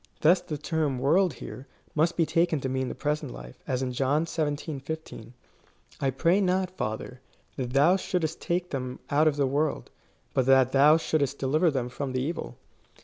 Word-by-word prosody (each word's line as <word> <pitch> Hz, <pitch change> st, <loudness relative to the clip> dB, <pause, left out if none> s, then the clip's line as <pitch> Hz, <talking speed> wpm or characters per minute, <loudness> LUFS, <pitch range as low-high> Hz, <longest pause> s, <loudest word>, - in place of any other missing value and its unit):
Thus 175 Hz, +4 st, +5 dB
the 150 Hz, -, -5 dB
term 150 Hz, -2 st, -1 dB
world 160 Hz, +7 st, +3 dB
here, 130 Hz, +3 st, -9 dB, 0.3 s
must 160 Hz, +3 st, +1 dB
be 165 Hz, -, +3 dB
taken 165 Hz, 0 st, +1 dB
to 130 Hz, -, -2 dB
mean 130 Hz, 0 st, -1 dB
the -, -, -5 dB
present 150 Hz, -, -2 dB
life, -, -, -11 dB
as 130 Hz, 0 st, -1 dB
in 130 Hz, -, -2 dB
John 140 Hz, +5 st, +1 dB
xvii. 150 Hz, -2 st, -3 dB
15. 140 Hz, -5 st, -7 dB, 0.7 s
I 135 Hz, -, +1 dB
pray 170 Hz, +9 st, +2 dB
not, 185 Hz, -1 st, +1 dB
Father, 125 Hz, -4 st, -5 dB, 0.3 s
that 125 Hz, -2 st, -4 dB
thou 155 Hz, +7 st, +5 dB
shouldest 170 Hz, -4 st, -2 dB
take 175 Hz, +1 st, -2 dB
them 130 Hz, -2 st, -4 dB
out 150 Hz, +2 st, +4 dB
of 150 Hz, -, +2 dB
the 145 Hz, -1 st, +1 dB
world, 145 Hz, +3 st, -1 dB, 0.4 s
but 130 Hz, -1 st, +1 dB
that 130 Hz, -1 st, +5 dB
thou 145 Hz, +3 st, +6 dB
shouldest 140 Hz, -4 st, 0 dB
deliver 155 Hz, +6 st, +2 dB
them 130 Hz, -5 st, -1 dB
from 130 Hz, +1 st, -5 dB
the 130 Hz, -, 0 dB
evil. 165 Hz, +4 st, -4 dB
145 Hz, 185 wpm, -27 LUFS, 130-160 Hz, 0.7 s, thou